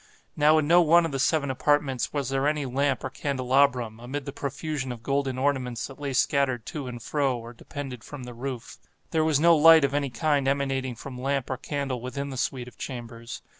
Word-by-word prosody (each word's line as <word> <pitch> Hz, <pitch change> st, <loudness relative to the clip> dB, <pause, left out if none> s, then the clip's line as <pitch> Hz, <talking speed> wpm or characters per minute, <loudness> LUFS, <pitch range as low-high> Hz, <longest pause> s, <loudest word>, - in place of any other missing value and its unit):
Now 155 Hz, +1 st, +5 dB
in 150 Hz, -2 st, +1 dB
no 175 Hz, +2 st, +6 dB
one 170 Hz, +1 st, +5 dB
of 165 Hz, -, -3 dB
the 135 Hz, -, -3 dB
seven 140 Hz, 0 st, +2 dB
apartments 135 Hz, -1 st, +1 dB
was 140 Hz, -3 st, -2 dB
there 135 Hz, +1 st, +1 dB
any 150 Hz, -1 st, 0 dB
lamp 135 Hz, +1 st, 0 dB
or 130 Hz, -, -4 dB
candelabrum, 130 Hz, -4 st, +1 dB
amid 130 Hz, +4 st, -5 dB
the 140 Hz, -, -4 dB
profusion 145 Hz, -1 st, -4 dB
of 120 Hz, -1 st, -8 dB
golden 135 Hz, -2 st, -1 dB
ornaments 130 Hz, -3 st, -1 dB
that 135 Hz, -, -11 dB
lay 145 Hz, -1 st, -3 dB
scattered 130 Hz, -2 st, +1 dB
to 145 Hz, -4 st, -5 dB
and 120 Hz, -1 st, -6 dB
fro 135 Hz, +1 st, 0 dB
or 115 Hz, +1 st, -9 dB
depended 130 Hz, -1 st, -7 dB
from 145 Hz, -3 st, -9 dB
the 125 Hz, 0 st, -8 dB
roof. 125 Hz, -1 st, -6 dB, 0.3 s
There 160 Hz, -1 st, +2 dB
was 155 Hz, -3 st, +2 dB
no 170 Hz, +1 st, +6 dB
light 160 Hz, 0 st, +8 dB
of 140 Hz, -, -2 dB
any 140 Hz, -1 st, 0 dB
kind 140 Hz, +1 st, +1 dB
emanating 135 Hz, -2 st, 0 dB
from 125 Hz, +1 st, -8 dB
lamp 135 Hz, -1 st, -1 dB
or 130 Hz, -, -2 dB
candle 135 Hz, -2 st, -3 dB
within 140 Hz, +3 st, -4 dB
the 130 Hz, -, -6 dB
suite 125 Hz, -1 st, -2 dB
of 125 Hz, -, -14 dB
chambers. 115 Hz, -2 st, -7 dB
135 Hz, 210 wpm, -26 LUFS, 125-145 Hz, 0.3 s, light